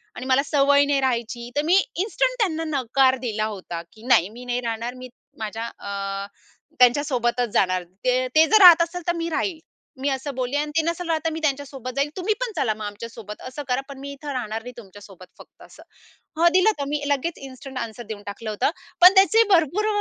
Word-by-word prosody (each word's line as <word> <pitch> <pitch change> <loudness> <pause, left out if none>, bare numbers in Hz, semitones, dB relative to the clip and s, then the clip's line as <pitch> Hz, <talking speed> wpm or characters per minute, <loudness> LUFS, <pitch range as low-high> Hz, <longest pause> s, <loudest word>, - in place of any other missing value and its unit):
आणि 250 - -7
मला 260 +1 +3
सवय 285 0 +4
नाही 285 -1 +1
राहायची, 240 -2 -2
तर 290 - +2
मी 345 +3 +4 0.2
इन्स्टंट 455 +7 0
त्यांना 325 -7 0 0.2
नकार 260 +1 +3
दिला 215 -2 -1
होता 175 -3 -7
की 220 +1 -16
"नाही, 190 -7 +4
मी 245 +3 -11
नाही 245 0 -1
राहणार. 230 +1 -3
मी 255 0 -10 0.3
माझ्या 220 +1 -4
अ, 195 0 -4 0.5
त्यांच्या 250 +3 +5
सोबतच 245 -4 0
जाणार 185 -1 +2 0.2
ते 255 0 +1
ते 315 +1 +7
जर 435 - +5
राहत 345 -2 +10
असतील 340 +1 -2
तर 345 - +2
मी 335 0 -3
राहील." 325 +1 -2 0.4
मी 280 - +1
असं 270 +1 -3
बोलली 255 +1 -2
अन् 295 0 -2
"ते - - +5
नसेल 340 +1 -2
राहत, 320 -1 +1
तर - - +3
मी 320 - -4
त्यांच्यासोबत 275 -4 -3
जाईल. 280 +1 0
तुम्ही 380 +4 0
पण - - -2
चला 255 -9 0
मग 215 0 -7
आमच्यासोबत. 210 0 -8
असं 275 +3 -7
करा. 250 +1 0
पण 275 - -9
मी 280 +1 -7
इथे 280 0 -7
राहणार 225 -3 -3
नाही 250 - -8
तुमच्यासोबत 195 -3 -13
फक्त - - -17
असं." - - -16 0.6
हां, 340 +1 +6
दिलं 370 +4 +5
तर 280 - -2
मी 295 0 -2
लगेच 285 +4 -1
इन्स्टंट 265 0 -10
आन्सर 230 +1 -6
देऊन 205 -2 -6
टाकलं 215 +2 -6
होतं. 210 +6 0 0.3
पण 365 +2 +10
त्याचे 395 +4 +6
भरपूर 355 +5 +2
260 Hz, 210 wpm, -23 LUFS, 230-315 Hz, 0.6 s, राहत